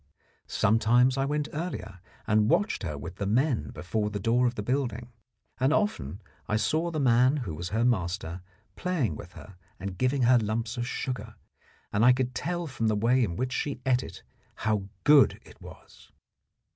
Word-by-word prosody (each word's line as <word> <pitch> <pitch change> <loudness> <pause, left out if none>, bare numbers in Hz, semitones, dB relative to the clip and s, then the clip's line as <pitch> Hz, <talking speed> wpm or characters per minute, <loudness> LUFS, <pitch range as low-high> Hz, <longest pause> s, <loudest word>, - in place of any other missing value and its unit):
Sometimes 120 +4 +3
I 135 0 0
went 150 +1 -1
earlier, 150 - -5 0.3
and 105 0 +3
watched 205 - +1
her 75 -6 -4
with 85 +5 -8
the 100 - -2
men 125 +4 +1
before 105 +4 -2
the 105 -1 -4
door 120 +4 +2
of 120 - -2
the 105 - -4
building, 120 -1 -2 0.5
and 130 +2 +3
often 110 - -1 0.2
I 105 - 0
saw 160 +9 0
the 160 -2 -3
man 130 +1 +4
who 85 - -4
was 85 +3 -5
her 115 +4 +1
master 90 -5 -1 0.3
playing 150 - -1
with 90 +4 -10
her 100 -3 -13 0.2
and 95 -1 -6
giving 130 +1 +1
her 120 +1 +6
lumps 110 +1 -2
of 120 0 -3
sugar, 130 -1 -4 0.6
and 105 +2 +2
I 125 +1 +7
could 130 0 -1
tell 175 +4 -2
from 130 -7 -2
the 110 - +2
way 120 +5 +3
in 85 -7 -2
which 130 +5 -2
she 140 -2 -2
ate 130 -1 +3
it - - -10 0.3
how 105 -3 -1 0.2
good 145 -2 +6
it - - -17
was. - - -14
120 Hz, 185 wpm, -28 LUFS, 105-130 Hz, 0.6 s, I